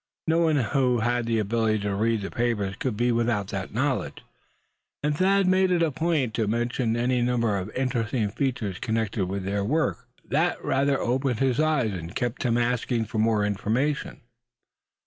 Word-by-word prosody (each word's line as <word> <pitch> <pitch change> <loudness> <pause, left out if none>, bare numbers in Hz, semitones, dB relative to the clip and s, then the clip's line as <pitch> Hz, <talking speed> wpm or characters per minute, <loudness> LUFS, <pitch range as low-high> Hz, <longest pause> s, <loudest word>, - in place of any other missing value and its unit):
No 165 +1 +2
one 160 -2 +3
who 125 -1 +1
had 120 0 0
the 115 -1 +1
ability 110 +1 +1
to 100 0 -1
read 110 +2 +1
the 100 - -5
papers 110 -5 -1
could 125 -6 -2
be 120 +1 +2
without 115 -4 0
that - - -4
knowledge. - - -2 0.8
And 150 0 +1
Thad 195 +3 +3
made 185 0 +3
it 175 -2 +2
a 160 - +1
point 150 -6 0
to 110 -1 0
mention 120 +1 0
any 125 +1 +1
number 120 -3 +1
of 95 +1 -3
interesting 120 -4 0
features 115 -7 -2
connected 110 -3 -1
with 95 +1 -3
their 100 +1 -1
work, 130 - -1 0.2
that - - +1
rather 135 +1 +2
opened 130 0 0
his 130 +1 +1
eyes, 150 -9 +2
and 85 +2 -7
kept 120 0 -2
him 120 -2 +1
asking 120 -1 0
for 110 +1 -4
more 110 -1 +2
information. 110 +8 -1
120 Hz, 175 wpm, -26 LUFS, 110-135 Hz, 0.8 s, one